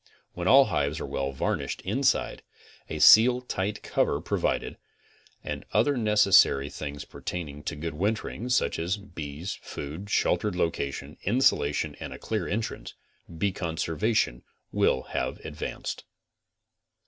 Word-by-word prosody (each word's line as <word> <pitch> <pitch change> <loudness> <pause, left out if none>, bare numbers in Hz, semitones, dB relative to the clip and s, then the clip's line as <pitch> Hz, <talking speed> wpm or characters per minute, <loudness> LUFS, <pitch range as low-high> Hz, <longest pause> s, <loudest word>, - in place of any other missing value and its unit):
When 90 0 -3
all 135 +5 +8
hives 75 -7 -1
are - - -4
well 70 0 -2
varnished 65 - -2
inside, 130 +7 0 0.5
a 80 - -4
seal 115 +10 +8
tight 105 -4 -3
cover - - +1
provided, - - -1 0.6
and - - -5
other 115 +8 +3
nec 110 -4 0
essary 70 -8 +5
things 75 -1 -6
pertaining 75 -5 -6
to 80 - -3
good 80 +2 -4
wintering, 110 +7 -2
such 125 - +1
as 90 +5 -1
bees, 85 -3 -7
food, 80 +8 -7
sheltered 105 -1 +1
location, 75 -4 -2
insulation 100 - +2
and - - -6
a - - -8
clear - - -3
entrance, 110 +2 -4 0.4
bee 100 +3 0
conserva 85 +5 -1
tion - - +1 0.3
will 65 - +2
have - - -2
advanced. 80 -1 -5
90 Hz, 135 wpm, -27 LUFS, 75-105 Hz, 0.6 s, all